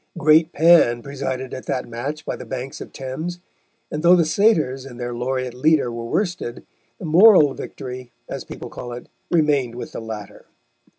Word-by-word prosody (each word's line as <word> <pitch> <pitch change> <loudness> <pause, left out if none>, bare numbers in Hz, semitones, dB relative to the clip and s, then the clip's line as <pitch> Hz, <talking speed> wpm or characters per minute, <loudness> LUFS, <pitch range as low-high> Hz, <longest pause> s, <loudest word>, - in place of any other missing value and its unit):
Great 160 0 +4
Pan 155 -8 +5
presided 130 -2 -4
at 130 - -7
that 125 - -2
match 135 +6 -5
by - - -3
the - - -9
banks 130 +1 -6
of - - -9
Thames, 155 +7 -5 0.5
and 150 - -3
though 175 +2 +7
the 170 -2 +3
satyrs 155 - +2
and 125 -2 -11
their 120 0 -4
laureate 130 +1 -2
leader 140 0 +2
were 115 0 -5
worsted, 175 - -2 0.3
the - - -8
moral 165 -3 +6
victory, 125 -2 -8 0.2
as - - -5
people - - -9
call 120 -1 -7
it, 120 - -9 0.2
remained 145 -8 +2
with 125 - -7
the - - -6
latter. 110 -3 -8
135 Hz, 175 wpm, -21 LUFS, 125-160 Hz, 0.5 s, though